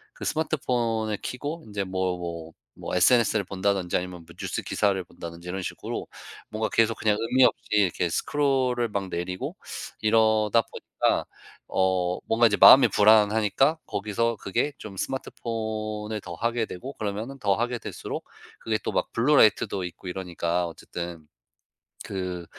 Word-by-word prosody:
그 - - -9
스마트폰을 120 -8 0
켜고 150 +6 -5
인제 100 -1 -3
뭐 95 -1 -1
뭐 85 -1 -6 0.2
뭐 - - -5
SNS 115 +5 +4
를 105 - +2
본다든지 95 -1 0
아니면 90 -1 -6
뭐 - - -15
뉴스 - - -3
기사를 100 -3 0
본다든지 85 0 -9
이런 95 +1 -3
식으로 - - -5 0.4
뭔가 110 0 -2
계속 115 0 +2
그냥 105 -1 +2
의미 125 +3 +3
없이 - - +2
이렇게 95 -4 +2
스크롤을 130 - +1
막 100 -2 -3
내리고 90 +1 -4 0.4
이러다 110 0 +3
보니까 - - -1 0.4
어 90 -1 +1
뭔가 115 +1 +5
이제 105 - +1
마음이 135 0 +9
불안하니까 110 +7 +4
거기서 110 +3 -1
그게 100 +11 -1
좀 100 -3 -9
스마트폰을 110 -3 -4
더 85 - -7
하게 115 +4 0
되고 130 +10 -7
그러면은 110 +6 -4
더 100 -5 +2
하게 120 +2 -1
될수록 - - -6 0.3
그게 110 -1 -1
또 - - -3
막 - - -1
블루 130 +6 +3
라이트도 100 -2 +4
있고 90 +1 -8
이러니까 90 -1 -2
어쨌든 85 -1 -7 0.8
그 90 -3 -4
105 Hz, 330 characters per minute, -26 LUFS, 90-115 Hz, 0.8 s, 마음이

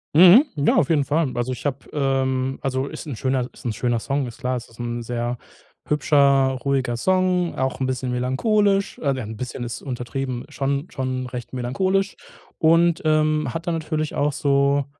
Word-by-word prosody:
Mhm, 185 - +9
ja, 145 0 +2
auf 135 - +3
jeden 150 -4 +3
Fall. 150 -2 +1
Also, 120 +1 -1
ich 125 - -6
hab, 140 0 -4
ähm 135 -2 0
Also, 135 0 -1
ist 155 +2 -8
'n 140 -6 -5
schöner 130 0 -1
ist - - -16
'n 115 - -1
schöner 120 0 0
Song, 140 +3 -1
ist 120 - -9
klar. 125 -1 -1
Es 120 - -6
ist 115 +1 -20
'n 120 0 -3
sehr 120 +1 -3 0.5
hübscher, 140 -3 +3
ruhiger 130 -4 0
Song, 185 +2 +1
auch 130 +1 -1
'n 130 - 0
bisschen 130 0 -2
melancholisch. 195 - +1
Also 135 -3 0
ja, - - -4
'n 110 0 -7
bisschen 125 0 -5
ist 120 -1 -5
untertrieben, 125 0 -4
schon 140 +2 -2
schon 130 -1 -3
recht 125 0 -7
melancholisch 185 +11 0 0.4
und, 165 +1 +4
ähm, 155 -3 +2
hat 165 +2 -5
dann 170 - +1
natürlich 155 -1 -3
auch 145 +1 +1
so 140 0 +2
135 Hz, 190 wpm, -22 LUFS, 125-155 Hz, 0.5 s, Mhm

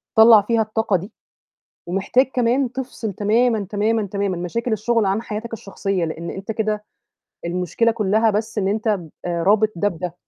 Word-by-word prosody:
طلّع 220 -1 +8
فيها 225 +2 +1
الطاقة 215 -2 0
دي، 195 +6 -9 0.8
ومحتاج 195 +8 +2
كمان 250 +1 +1
تفصل 245 -5 -5
تمامًا، 220 +2 +1
تمامًا، 215 +1 +1
تمامًا 200 -1 -2
مشاكل 225 +7 -3
الشغل 220 0 +1
عن 200 +4 0
حياتك 225 +1 -6
الشخصية، 195 -4 -2
لأن 165 +1 -5
أنت 195 +3 -5
كده، 215 -1 -2 0.6
المشكلة 180 +6 0
كُلّها 220 +1 +2
بس 220 +1 -2
إن 195 -1 +1
أنت 220 +2 -1
ب 180 -7 -1 0.2
رابط 200 +5 +2
ده 205 +4 +2
بده، 175 -1 -5
210 Hz, 160 wpm, -21 LUFS, 195-225 Hz, 0.8 s, طلّع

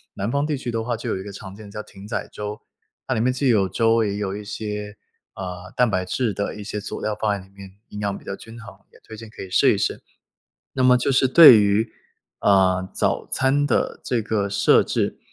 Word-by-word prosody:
南 100 - -3
南 115 - -1
方 140 +1 +1
地 150 -2 -1
区 130 -2 -6
的 115 -1 -2
话 120 0 -2
就 - - -5
有 - - -1
一 95 - -6
个 100 - -8
常 95 -1 -10
见 105 -1 -12
叫 105 - -6
艇 100 -1 -14
仔 110 - -4
粥。 105 0 -6 0.5
它 - - 0
里 110 - 0
面 125 +2 +2
既 130 +2 -1
有 105 -6 +3
粥 115 +3 +2
也 100 -2 -2
有 100 -2 -3
一 105 - -7
些， 105 0 -6 0.4
啊， 90 -1 -7
蛋 125 -1 +4
白 95 -3 0
质 115 +2 -1
的 100 +2 -3
一 105 - -8
些 105 0 -4
佐 - - -6
料 110 - -2
放 105 -1 +1
在 95 - -16
里 - - -25
面， 95 -1 -11 0.2
营 105 - -8
养 100 -1 -2
比 - - -16
较 - - -4
均 115 +3 -12
衡， 100 -4 -11 0.2
也 - - -20
推 110 - -11
荐 110 0 -11
可 - - -11
以 95 - -8
试 - - +4
一 - - -2
试。 - - -2 0.7
那 130 - 0
么 125 0 +6
就 125 - 0
是 130 0 +3
对 130 -3 +9
于， 105 +2 +1 0.5
呃， 95 -2 +3
早 - - 0
餐 140 +2 +1
的 135 - 0
这 120 -3 0
个 105 -2 -1
设 100 - +4
置， - - -2
105 Hz, 265 characters per minute, -22 LUFS, 100-115 Hz, 0.7 s, 对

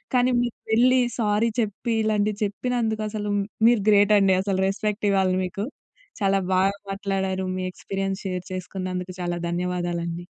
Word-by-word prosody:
కానీ, 250 +1 +4
మీరు 240 -2 -2 0.2
వెళ్లి 255 +2 +5 0.2
సారీ 215 +1 +2
చెప్పి, 220 +2 -2
ఇలాంటివి 210 -1 +1
చెప్పినందుకు 220 +1 -1
అసలు 210 -1 -3 0.4
మీరు 235 -4 +4
గ్రేటండి. 200 -2 +5
అసల 195 -1 -1
రెస్పెక్ట్ 210 +1 -1
ఇవ్వాలి 190 -1 +2
మీకు. 195 +4 -4 0.6
చాలా 195 0 +3 0.2
బాగా 195 +2 +3 0.2
మాట్లాడారు. 195 -1 -2
మీ 185 - -3
ఎక్స్‌పీరియన్స్ 195 +1 -3
షేర్ 180 -1 -3
చేసుకున్నందుకు 185 0 -4
చాలా 175 0 -2
ధన్యవాదాలండి. 175 -1 -2
195 Hz, 135 wpm, -24 LUFS, 185-215 Hz, 0.6 s, వెళ్లి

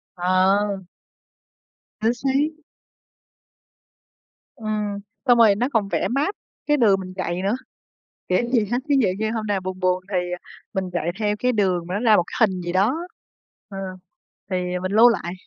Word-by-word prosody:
Ờ. 190 +2 +2 1.2
Chính 225 +2 +3
xác. 280 +5 -1 1.9
Ừm, 210 -4 -3 0.3
xong 245 -2 +5
rồi 220 -4 +6
nó 240 +5 0
còn 215 -4 +2
vẽ - - 0
map 285 +10 0 0.3
cái 295 0 +3
đường 205 -7 +4
mình 185 -1 -7
chạy 180 -1 -2
nữa, 200 +4 +1 0.7
kiểu 185 - +3
gì 235 -5 +3
ha 240 - +2
ví 285 - +4
dụ 230 - +3
như 220 0 0
hôm 220 -1 -3
nào 205 -2 +1
buồn 185 0 -5
buồn 185 0 +1
thì, 180 -1 0
ờ, 180 - -2 0.4
mình 190 -1 -2
chạy 175 -1 -1
theo 210 -1 +1
cái 250 +3 +2
đường 185 -6 0
mà 180 - -4
nó - - 0
ra 225 -2 +5
một 175 - +3
cái 220 - +3
hình 185 -1 -4
gì 175 0 -3
đó, 200 - +2 0.7
ờ, 195 - -8 0.7
thì 185 - 0 0.3
mình 185 +1 -2
lưu 225 +3 +8
lại, 190 -7 -1
205 Hz, 175 wpm, -23 LUFS, 185-230 Hz, 1.9 s, lưu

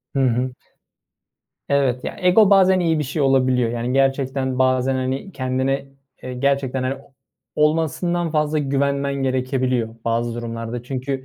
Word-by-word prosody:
Hı - - +1
hı. 125 +2 0 1.2
Evet, 135 -3 +1
ya, - - -5
ego 190 +3 +5
bazen 190 -1 +5
iyi 165 -3 +1
bir - - 0
şey 145 +3 -3
olabiliyor. 130 -3 +2
Yani, 120 +2 -2
gerçekten 135 -1 0
bazen, 130 0 +2
hani, 130 +9 -3
kendine, 130 +1 -1 0.4
eee, 130 0 -5
gerçekten, 135 0 0
hani, 130 +1 -1
o 135 0 -18 0.4
olmasından 165 +3 +1
fazla 150 0 +1
güvenmen 140 0 0
gerekebiliyor 130 -3 -1
bazı 115 0 -1
durumlarda. 115 0 -5
Çünkü, 130 +1 -4
135 Hz, 140 wpm, -21 LUFS, 125-140 Hz, 1.2 s, ego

